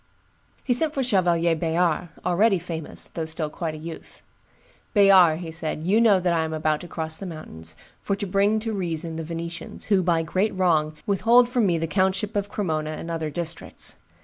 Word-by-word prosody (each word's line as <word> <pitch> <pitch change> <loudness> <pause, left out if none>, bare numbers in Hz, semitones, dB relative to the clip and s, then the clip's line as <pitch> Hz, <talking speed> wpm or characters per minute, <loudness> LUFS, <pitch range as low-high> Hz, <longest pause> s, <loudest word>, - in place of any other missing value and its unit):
He 250 - +1
sent 310 +4 +1
for 270 - 0
Chevalier 175 -7 +2
Bayard, 170 +1 0 0.2
already 195 +3 +3
famous, 165 -2 +1
though 165 - -4
still 160 -1 -1
quite 160 -1 -4
a - - -7
youth. 160 +1 -10 0.7
"Bayard," 180 -5 +5
said 160 -1 -2
he, 180 - -1
"you 220 +2 +4
know 210 -5 +5
that 175 -1 +1
I 165 -1 +1
am 160 0 -4
about 155 -1 0
to 175 - -9
cross 160 -1 -3
the 195 - -7
mountains, 80 - -7 0.3
for 200 - -1
to 200 +1 -4
bring 200 +3 +2
to 225 0 -3
reason 170 -4 -2
the 165 - -4
Venetians, 165 +1 -6
who 190 - +4
by 170 -2 +1
great 190 +6 -1
wrong 155 -4 +2
withhold 235 +5 +4
from 245 -4 +1
me 170 -2 +1
the 165 - -1
countship 190 +4 0
of 205 0 -1
Cremona 160 -7 -2
and 165 +2 -6
other 160 -2 -3
districts. 165 +2 -3
175 Hz, 195 wpm, -24 LUFS, 160-195 Hz, 0.7 s, Bayard